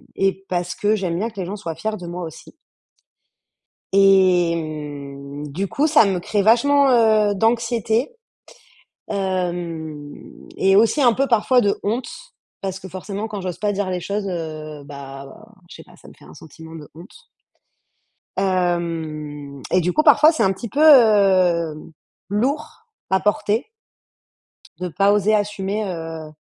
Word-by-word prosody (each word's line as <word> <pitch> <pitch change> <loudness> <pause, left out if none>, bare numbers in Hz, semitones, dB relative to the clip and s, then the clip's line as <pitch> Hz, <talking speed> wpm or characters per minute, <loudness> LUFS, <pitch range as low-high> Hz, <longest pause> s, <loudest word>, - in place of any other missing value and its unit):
et 195 0 -1
parce 180 0 -2
que 210 +1 +1
j'aime 180 -5 -2
bien 220 +5 -2
que 215 -3 -11
les 185 - -3
gens 200 +3 -5
soient 165 -5 -6
fiers 215 +6 -3
de 180 -3 -9
moi 175 +1 -5
aussi 160 -2 -10 1.4
et 190 -3 +4
mmh, 145 -2 -7
du 180 +8 -3
coup, 290 +9 +1
ça 300 -5 +5
me 190 -3 -1
crée 205 +3 -1
vachement, 275 +6 +4
heu, 220 -4 +4
d'anxiété, 230 - 0 0.9
hem 175 -6 -4 0.4
et 195 0 +3
aussi 225 +8 +3
un 240 -3 +5
peu 275 +4 0
parfois 245 +1 +3
de 200 -2 0
honte, 230 +4 -2 0.5
parce 190 -1 -4
que 190 - -10
forcément 195 +3 -6
quand 205 -2 -6
j'ose 180 -2 -5
pas 210 -1 0
dire 200 -1 -2
les 180 -1 -2
choses, 200 +3 -3
heu, 155 -4 -6
bah, 140 -1 -9 0.4
je - - -11
sais - - -12
pas, - - -19
ça - - -17
me - - -14
fait - - -18
un - - -14
sentiment 160 +1 -13
de 150 -2 -10
honte 190 - -15 1.1
hem 160 -6 -2
et 185 - +3
du 180 +1 0
coup, 310 - +2
parfois, 310 +1 +6
c'est 315 - -1
un 190 - +3
petit 210 +5 -7
peu, 280 - -3
hem, 190 - +4 0.4
lourd 255 - -2 0.2
à 190 0 +2
porter 210 +4 0 1.1
de 180 0 -3
pas 200 +4 +2
oser 210 +1 +2
assumer, 205 0 -1
heu 165 -4 -6
190 Hz, 160 wpm, -21 LUFS, 165-215 Hz, 1.4 s, parfois